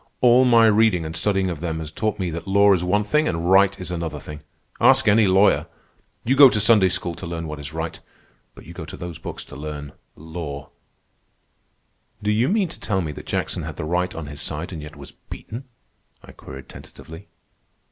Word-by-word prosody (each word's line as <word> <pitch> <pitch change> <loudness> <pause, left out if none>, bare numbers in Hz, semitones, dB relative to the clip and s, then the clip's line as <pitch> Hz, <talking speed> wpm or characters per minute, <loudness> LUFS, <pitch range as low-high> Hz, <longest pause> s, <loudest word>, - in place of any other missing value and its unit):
"All 125 +1 +5
my 115 -2 +6
reading 110 -6 +3
and 80 +1 -6
studying 95 0 0
of 80 - -6
them 80 -1 -3
has 80 -1 -6
taught 105 +4 -2
me 90 -3 -2
that 85 +2 -6
law 100 +1 +5
is 90 -2 0
one 100 +4 +1
thing 150 +9 +1
and 85 +1 -1
right 100 0 +4
is 90 -1 -6
another 80 -4 -4
thing. 75 0 -9 0.4
Ask - - +5
any 105 0 +5
lawyer. 95 +2 +3 0.6
You 130 +4 +1
go 140 -1 +9
to 110 - 0
Sunday 105 -3 +4
school 90 -1 -3
to 85 - -8
learn 85 -1 -5
what 75 -1 -6
is 70 0 -7
right. 80 0 -5 0.6
But - - -14
you - - -11
go - - -7
to - - -9
those 85 -2 -7
books - - -7
to - - -12
learn... 75 0 -7 0.2
law." 75 -3 -7 1.5
"Do 105 - +1
you 115 +6 +2
mean 200 -3 +1
to - - -12
tell 95 -3 -1
me 80 -3 -4
that - - -10
Jackson - - -2
had - - -6
the - - -5
right 90 +3 -1
on 80 - -6
his 75 0 -8
side 80 +5 -5
and 80 - -6
yet 75 +1 -10
was 70 -1 -11
beaten?" 120 +5 -10 0.6
I - - -13
queried 65 0 -11
tentatively. 80 +5 -13
90 Hz, 210 wpm, -22 LUFS, 80-105 Hz, 1.5 s, go